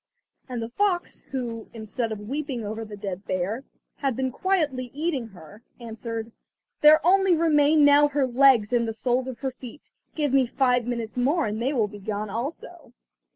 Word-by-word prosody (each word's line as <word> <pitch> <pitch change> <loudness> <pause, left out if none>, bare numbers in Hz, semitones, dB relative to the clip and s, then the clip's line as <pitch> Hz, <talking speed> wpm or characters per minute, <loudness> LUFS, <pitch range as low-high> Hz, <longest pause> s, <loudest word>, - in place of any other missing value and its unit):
And 245 -2 -3
the 225 - -5
fox, 360 +5 -1
who, 235 -4 -5
instead 225 +1 -3
of 210 -1 -6
weeping 270 -3 -3
over 220 +2 -4
the 210 -1 -9
dead 195 -1 -5
bear, 190 +7 -2 0.3
had 270 -4 -1
been 260 +1 -1
quietly 295 -7 -1
eating 295 -6 -2
her, 195 +1 -14 0.2
answered: 230 -1 -6 0.5
"There 305 +1 +7
only 385 0 +5
remain 305 -2 +4
now 290 +1 +6
her 285 -1 +1
legs 250 -3 +4
and 235 -1 +2
the 225 - -3
soles 250 +3 0
of 255 -2 -6
her 265 -1 -2
feet. 255 +2 -11 0.2
Give 295 -4 0
me 265 -2 +4
five 250 -1 +1
minutes 235 -1 -3
more 290 +6 +2
and 215 +2 -3
they 260 +4 +1
will 230 -7 +1
be 205 0 -11
gone 205 +1 -4
also!" 280 - -6
250 Hz, 180 wpm, -25 LUFS, 225-290 Hz, 0.5 s, There